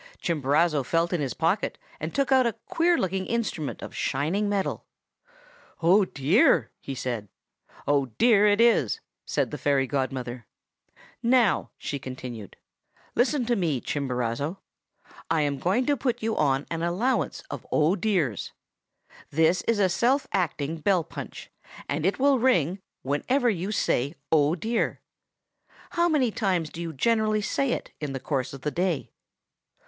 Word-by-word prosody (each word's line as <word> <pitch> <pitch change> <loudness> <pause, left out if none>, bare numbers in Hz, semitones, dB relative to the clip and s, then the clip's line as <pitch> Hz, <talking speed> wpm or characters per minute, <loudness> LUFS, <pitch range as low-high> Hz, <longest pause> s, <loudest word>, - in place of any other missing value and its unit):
"Chimborazo 150 0 +2
felt 165 +7 0
in 170 - 0
his 135 -3 -2
pocket, 175 +6 0 0.2
and 160 +1 -4
took 275 -1 +1
out 260 -2 +5
a 230 - -1
queer 340 +1 +2
looking 190 0 -1
instrument 215 -10 -2
of - - -8
shining 170 +10 0
metal. 200 -2 -2 1.0
'Oh, 190 +4 +5
dear!' 160 - +3
he 135 - -6
said. 120 -5 -3 0.6
"'"Oh, 140 -2 +2
dear!" 215 -3 +5
it 205 +1 +3
is!' 230 - +4 0.3
said - - 0
the - - -5
fairy 140 -2 +2
godmother. 130 -3 -3 0.7
'Now,' 235 -4 +3
she 140 - -4
continued, 125 -5 -8 0.6
'listen 250 +1 +2
to 240 +1 +1
me, 165 - 0
Chimborazo! 130 +4 -2 0.7
I 160 -1 +2
am 145 -2 -1
going 195 - +1
to 290 - +2
put 250 -4 -2
you 225 0 0
on 135 -1 +1
an 165 -1 -2
allowance 185 +10 0
of - - -7
"Oh, 155 +5 +3
dears." 180 - -1 0.8
This 160 +4 +3
is 230 - +3
a 200 -2 +4
self 245 +10 +2
acting 165 -4 -1
bell 180 +1 +2
punch, - - -9 0.4
and 150 +4 0
it 195 - 0
will 275 -1 +3
ring 195 - +2 0.2
whenever 240 - +1
you 190 +1 -3
say 140 - 0 0.2
"Oh, 155 0 +4
dear!" 225 +7 -1 0.9
How 345 0 +2
many 270 -7 +2
times 185 -8 0
do 170 - -7
you 165 -1 -4
generally 215 - +1
say 275 +4 0
it - - -5
in 145 -2 -3
the 135 - -3
course 130 -1 -2
of 140 - -9
the 150 - -2
day? 175 -2 -1
170 Hz, 155 wpm, -26 LUFS, 140-220 Hz, 1.0 s, out